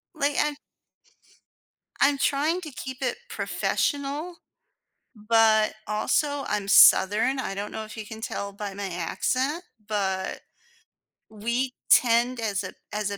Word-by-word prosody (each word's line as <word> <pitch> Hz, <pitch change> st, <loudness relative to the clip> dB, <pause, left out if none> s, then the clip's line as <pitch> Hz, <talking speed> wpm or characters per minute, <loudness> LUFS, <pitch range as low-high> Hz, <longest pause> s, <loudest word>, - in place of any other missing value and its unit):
Like, 285 Hz, -2 st, 0 dB
I 295 Hz, 0 st, +1 dB, 1.5 s
I'm 280 Hz, 0 st, +4 dB
trying 300 Hz, +6 st, +1 dB
to 310 Hz, -4 st, -8 dB
keep 260 Hz, 0 st, -7 dB
it 255 Hz, -, -1 dB
professional, 290 Hz, +5 st, -2 dB, 0.9 s
but, 220 Hz, -1 st, +4 dB
also, 280 Hz, +7 st, 0 dB
I'm 205 Hz, -2 st, -2 dB
Southern, 215 Hz, +8 st, +6 dB
I 195 Hz, -6 st, -3 dB
don't 205 Hz, +1 st, -5 dB
know 220 Hz, -, -5 dB
if 220 Hz, -, -11 dB
you 215 Hz, -, -6 dB
can 220 Hz, 0 st, -9 dB
tell 200 Hz, -2 st, -4 dB
by 200 Hz, -1 st, -6 dB
my 200 Hz, 0 st, -4 dB
accent, 260 Hz, -, -1 dB, 0.2 s
but 190 Hz, -3 st, -2 dB, 0.9 s
we 235 Hz, +5 st, -2 dB, 0.2 s
tend 240 Hz, +1 st, +4 dB
as 200 Hz, -2 st, -1 dB
a 185 Hz, -, -7 dB, 0.2 s
as 210 Hz, -1 st, -2 dB
a 200 Hz, -, -4 dB
230 Hz, 130 wpm, -26 LUFS, 205-280 Hz, 1.5 s, Southern